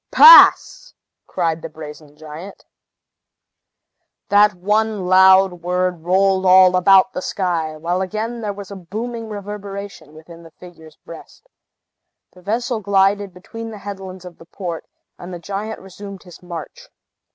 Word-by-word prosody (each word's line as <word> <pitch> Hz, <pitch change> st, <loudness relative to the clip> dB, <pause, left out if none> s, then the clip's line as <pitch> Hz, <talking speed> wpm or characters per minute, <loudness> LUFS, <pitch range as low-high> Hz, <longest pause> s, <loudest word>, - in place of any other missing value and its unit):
"Pass!" -, -, +6 dB, 0.3 s
cried 165 Hz, -3 st, -2 dB
the 165 Hz, -, -8 dB
brazen 150 Hz, -1 st, -12 dB
giant. 155 Hz, +5 st, -11 dB, 1.6 s
That 205 Hz, 0 st, +4 dB
one 210 Hz, +2 st, -1 dB
loud 190 Hz, -1 st, +4 dB
word 180 Hz, 0 st, -2 dB
rolled 190 Hz, +1 st, +1 dB
all 185 Hz, 0 st, +5 dB
about 190 Hz, +1 st, +4 dB
the -, -, -5 dB
sky, 170 Hz, -6 st, -3 dB
while 175 Hz, +4 st, -3 dB
again 220 Hz, +5 st, -5 dB
there 210 Hz, -2 st, -3 dB
was 200 Hz, -1 st, -10 dB
a -, -, -7 dB
booming 225 Hz, +5 st, -7 dB
reverberation 200 Hz, -5 st, -9 dB
within 165 Hz, +2 st, -14 dB
the 165 Hz, -, -15 dB
figure's 160 Hz, -2 st, -16 dB
breast. 165 Hz, -, -15 dB, 0.9 s
The 180 Hz, -, -18 dB
vessel 230 Hz, +5 st, -3 dB
glided 200 Hz, 0 st, 0 dB
between 225 Hz, +5 st, -10 dB
the 220 Hz, -, -9 dB
headlands 190 Hz, -2 st, -9 dB
of 175 Hz, -2 st, -13 dB
the 165 Hz, -, -15 dB
port, 175 Hz, -3 st, -7 dB, 0.3 s
and 175 Hz, -, -10 dB
the 175 Hz, -, -7 dB
giant 200 Hz, +5 st, -6 dB
resumed 195 Hz, +1 st, -12 dB
his 180 Hz, -2 st, -15 dB
march. 170 Hz, -3 st, -10 dB
190 Hz, 140 wpm, -19 LUFS, 175-205 Hz, 1.6 s, Pass